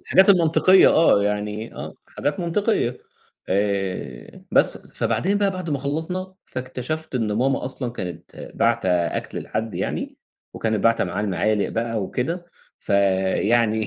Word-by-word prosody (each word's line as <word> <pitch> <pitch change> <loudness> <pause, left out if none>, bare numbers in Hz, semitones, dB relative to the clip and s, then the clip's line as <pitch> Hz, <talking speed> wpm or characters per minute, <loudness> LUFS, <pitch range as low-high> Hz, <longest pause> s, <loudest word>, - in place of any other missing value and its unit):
الحاجات 190 +2 +4
المنطقية 185 +1 +6
آه، 160 -11 +5
يعني 105 +2 -2
آه. - - -7
حاجات 165 +6 -3
منطقية، 170 - 0 0.5
آآ 95 -10 -2
بس. - - +2
فبعدين 200 +3 0
بقى 200 -1 +2
بعد 185 -4 -5
ما 140 - 0
خلّصنا، 165 +7 -3
فاكتشفت 130 +5 -5
إن 110 -4 0
ماما 130 +5 +1
أصلًا 125 -1 -4
كانت 90 -7 -7
باعتة 115 -4 +1
أكْل 85 -1 -1
لحد 110 0 -4
يعني - - -3 0.4
وكانت 110 -3 -1
باعتة 115 -2 +4
معاه 90 +3 -3
المعالِق 105 +1 +1
بقى 115 -2 -2
وكده، 165 - -3 0.3
فيعني 100 +3 +2
115 Hz, 130 wpm, -23 LUFS, 105-160 Hz, 0.5 s, المنطقية